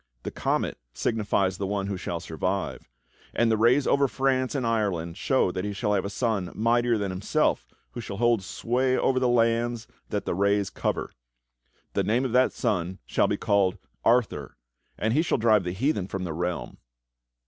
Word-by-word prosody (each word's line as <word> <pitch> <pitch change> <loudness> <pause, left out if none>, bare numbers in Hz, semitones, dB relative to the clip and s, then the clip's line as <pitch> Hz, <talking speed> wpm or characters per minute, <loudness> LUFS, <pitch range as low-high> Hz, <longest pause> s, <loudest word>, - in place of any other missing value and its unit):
The - - -4
comet - - -1 0.2
signifies 100 - 0
the 100 - -1
one 100 0 -1
who 100 0 -2
shall 85 -2 -4
survive, 90 -1 -3 0.5
and 115 -1 +3
the - - +4
rays 120 +5 +4
over 140 0 +3
France 130 0 0
and 130 -3 -1
Ireland 100 -8 -1
show 130 -5 +1
that 95 0 -3
he 105 0 -3
shall 105 +1 0
have 100 -1 +1
a - - -2
son 100 -4 -1
mightier 120 +1 +2
than 100 -2 -2
himself 95 +1 0 0.2
who 120 - -6
shall 100 -3 -6
hold 120 -1 +3
sway 125 +6 0
over 130 -1 +2
the 130 - +2
lands 115 0 +1 0.2
that - - -2
the - - -1
rays 100 +1 +1
cover. - - -2 0.8
The - - +1
name 120 +5 +1
of 130 - -2
that 125 +2 +4
son 90 -1 -1
shall - - +2
be - - 0
called 100 -2 +2 0.3
ARTHUR, 115 - +1 0.4
and 110 +1 0
he 150 - +4
shall 170 - +1
drive 110 -4 +4
the 90 - -2
heathen 100 - 0
from 95 -1 -4
the 85 -3 -3
realm." 90 +2 -3
105 Hz, 185 wpm, -26 LUFS, 95-120 Hz, 0.8 s, the